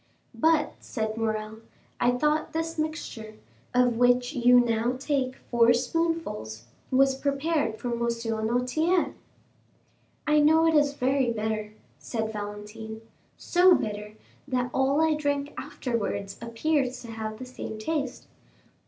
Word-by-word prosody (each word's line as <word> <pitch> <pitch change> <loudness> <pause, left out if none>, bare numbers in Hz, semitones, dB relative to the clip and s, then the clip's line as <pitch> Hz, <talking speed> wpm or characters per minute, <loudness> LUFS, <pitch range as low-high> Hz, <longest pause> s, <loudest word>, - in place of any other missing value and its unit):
"But," 315 -1 +2
said 220 -2 -3
Morrel, 220 -1 -2 0.4
"I 240 - +3
thought 300 +4 0
this 325 0 -2
mixture, 275 -9 -4 0.4
of 250 -2 +3
which 245 +2 +3
you 245 -2 +6
now 235 0 +1
take 265 -2 -1
four 235 -2 +3
spoonfuls, 245 - -2 0.2
was 270 +1 +4
prepared 280 -3 -1
for 245 - -4
M. 235 - -3
Noirtier?" 235 +8 0 1.1
"I 300 0 +4
know 320 +2 +5
it 325 - +4
is 290 -2 +3
very 260 -1 +1
bitter," 215 -1 -3 0.3
said 220 - -3
Valentine; 210 +1 -7 0.4
"so 360 0 +5
bitter, 210 0 -4 0.3
that 250 -2 -1
all 270 +3 +2
I 320 -1 +3
drink 285 -1 -1
afterwards 200 -5 -3
appears 255 +3 0
to 235 - -9
have 220 -1 -5
the 255 - -7
same 250 -3 -7
taste." 275 +3 -3
245 Hz, 125 wpm, -27 LUFS, 220-295 Hz, 1.1 s, you